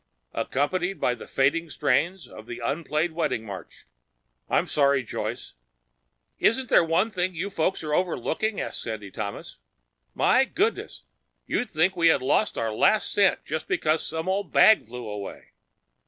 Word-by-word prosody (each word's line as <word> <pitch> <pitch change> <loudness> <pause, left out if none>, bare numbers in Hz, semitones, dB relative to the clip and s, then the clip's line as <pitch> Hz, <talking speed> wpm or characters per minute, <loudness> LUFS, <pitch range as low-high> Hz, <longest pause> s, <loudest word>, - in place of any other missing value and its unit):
"Accompanied 180 +7 -1
by 125 - +1
the - - -10
fading 160 +5 +1
strains 165 +7 0
of 110 +1 -13
an 120 - -6
unplayed 155 +4 -1
wedding 160 -9 -2
march. 95 -6 -10 0.6
I'm - - +2
sorry, 140 -2 +2
Joyce." - - -5 0.9
"Isn't 255 +2 +2
there - - +6
one 170 +7 +1
thing 185 -2 -1
you 190 +5 -3
folks 185 0 -1
are 150 -1 -3
overlooking?" 185 - -1
asked - - -4
Sandy 110 -3 -6
Thomas. 100 - -6 0.6
"My 265 - +4
goodness, 400 +11 -2 0.4
you'd 245 - -1
think 175 +4 +1
we 170 -1 +3
had 160 - +4
lost 150 +11 +1
our 115 -1 -1
last 215 - +2
cent 200 -2 +2
just 160 +1 -4
because 155 +1 0
that 160 - -4
little 165 +4 -1
old 200 -1 -3
bag 220 - +6
flew 120 0 -7
away!" 105 -1 -7
160 Hz, 155 wpm, -25 LUFS, 130-185 Hz, 0.9 s, there